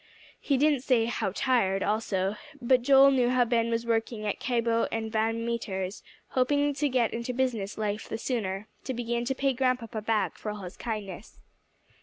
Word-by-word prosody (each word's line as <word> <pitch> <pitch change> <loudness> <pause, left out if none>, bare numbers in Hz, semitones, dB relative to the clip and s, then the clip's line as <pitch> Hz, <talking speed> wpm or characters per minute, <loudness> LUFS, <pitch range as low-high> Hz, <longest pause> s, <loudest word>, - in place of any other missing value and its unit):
He 275 - +1
didn't 295 0 +3
say 250 -4 +2
"how 230 -4 -1
tired" 195 -4 +1
also, 205 -2 0 0.2
but 255 0 +3
Joel 275 +2 +7
knew 250 -3 +3
how 250 -1 +3
Ben 230 -1 +1
was 230 0 -1
working 225 -1 -1
at 205 - -2
Cabot 230 -2 +1
and 220 -1 -3
Van 225 +1 0
Meter's, 195 -5 -3 0.3
hoping 285 +3 +2
to 290 +1 0
get 245 -3 +1
into 235 +2 -3
business 240 -6 -1
life 210 0 -3
the - - -3
sooner, 210 -4 -3 0.2
to 260 - -3
begin 235 0 -2
to 265 +2 -1
pay 275 0 +1
Grandpapa 250 -4 -1
back 215 0 -1
for 215 - -4
all 210 -1 -6
his 180 - -8
kindness. 210 -4 -6
230 Hz, 180 wpm, -28 LUFS, 215-255 Hz, 0.3 s, Joel